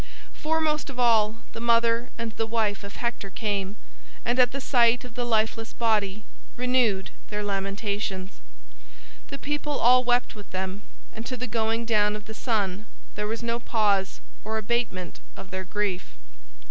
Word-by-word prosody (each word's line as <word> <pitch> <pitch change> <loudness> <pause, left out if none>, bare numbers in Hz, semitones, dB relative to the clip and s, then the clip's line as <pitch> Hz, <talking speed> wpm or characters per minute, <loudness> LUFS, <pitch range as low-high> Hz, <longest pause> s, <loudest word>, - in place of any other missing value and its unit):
Foremost 310 -1 0
of 255 -2 -7
all, 225 -3 +4 0.2
the - - -6
mother 235 +1 +3
and 230 -1 -3
the 225 +1 -2
wife 220 -3 0
of 200 - -8
Hector 235 -4 -2
came, 200 -1 -2 0.5
and 240 +2 +1
at 245 -1 +6
the 275 - -3
sight 245 -2 +4
of 245 - -10
the 245 - -2
lifeless 225 0 +1
body 215 -3 +1 0.3
renewed 245 -6 +2 0.2
their 210 0 -2
lamentations. 195 -1 -2 0.9
The 275 - -5
people 295 0 -2
all 250 +2 +6
wept 245 0 +2
with 205 -2 -11
them, 190 +2 -3 0.3
and 225 - -6
to 255 - -3
the 250 - -2
going 225 0 0
down 210 -2 +3
of 210 0 -7
the 220 - -7
sun 215 -3 -1 0.3
there 210 0 -2
was 225 +2 -3
no 235 0 0
pause 205 -5 +1 0.2
or 220 0 -2
abatement 215 -5 -1 0.2
of 190 - -10
their 190 0 -3
grief. 195 - -2
225 Hz, 160 wpm, -27 LUFS, 205-240 Hz, 0.9 s, at